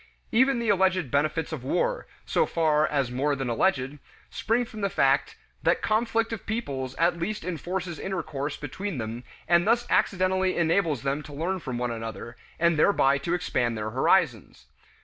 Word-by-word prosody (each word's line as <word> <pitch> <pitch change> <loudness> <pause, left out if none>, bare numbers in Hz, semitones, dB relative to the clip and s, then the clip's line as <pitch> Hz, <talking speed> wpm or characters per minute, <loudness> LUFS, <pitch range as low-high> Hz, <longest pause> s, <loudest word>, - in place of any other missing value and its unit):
Even 260 +3 +4
the 235 -2 -1
alleged 185 -6 +2
benefits 155 +3 0
of 150 -6 -5
war, - - -1 0.2
so 475 - +1
far 155 -2 +2
as 140 -4 0
more 140 +3 0
than 135 -2 -3
alleged, 135 +1 0 0.3
spring 235 +3 0
from 220 -2 -9
the 200 - +1
fact 140 - +2 0.3
that - - +1
conflict 225 +1 +1
of 215 - -7
peoples 135 - -3
at 170 +1 +1
least 210 +5 -3
enforces 175 0 -4
intercourse 150 -6 -3
between 170 +5 -5
them 115 +1 -5 0.2
and 170 +2 +4
thus 240 +1 +3
accidentally 185 0 +2
enables 165 -5 +1
them 140 +2 -1
to 150 - -11
learn 175 +6 -2
from 130 -7 -5
one 120 0 -1
another, 115 +1 -6 0.2
and 170 -1 +2
thereby 140 -7 +4
to 170 +5 -1
expand 120 -9 -1
their 110 0 -3
horizons. 130 - +1
165 Hz, 170 wpm, -26 LUFS, 135-190 Hz, 0.3 s, Even